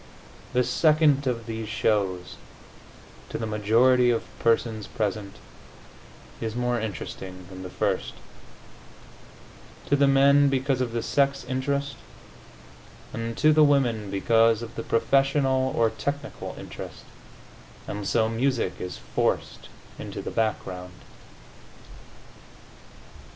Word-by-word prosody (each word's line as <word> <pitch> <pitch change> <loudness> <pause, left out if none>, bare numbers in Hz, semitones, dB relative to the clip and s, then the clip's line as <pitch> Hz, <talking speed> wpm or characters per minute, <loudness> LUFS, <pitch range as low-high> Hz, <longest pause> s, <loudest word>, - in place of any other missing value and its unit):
The 125 0 +3
second 150 +1 +3
of 115 -2 -2
these 110 -1 -5
shows, 95 -5 0 0.9
to - - -4
the 115 - -3
majority 115 +4 +3
of 115 -2 +1 0.2
persons 115 -2 +1
present, 100 -2 -3 1.1
is 110 0 -3
more 125 0 0
interesting 95 -4 -6
than 95 0 -8
the 90 - -7
first 90 - -1 1.7
to 145 - +2
the 140 0 +4
men 140 +1 +5
because 135 -1 0
of 125 -2 -1
the 115 0 -2
sex 140 -1 +1
interest, 140 +2 -2 1.2
and 115 0 -4
to 155 +1 +5
the 155 0 +6
women 120 -8 +2
because 115 +3 +3
of 115 0 -8
the - - -5
professional 135 +2 +2
or 115 -1 +3
technical 140 0 -5
interest - - -9 0.8
and 105 -1 -4
so 110 -1 +2
music 115 -2 -1
is 90 -1 -5
forced - - -2 0.3
into - - -6
the - - -5
background. 95 -5 -2
115 Hz, 115 wpm, -26 LUFS, 110-135 Hz, 1.7 s, the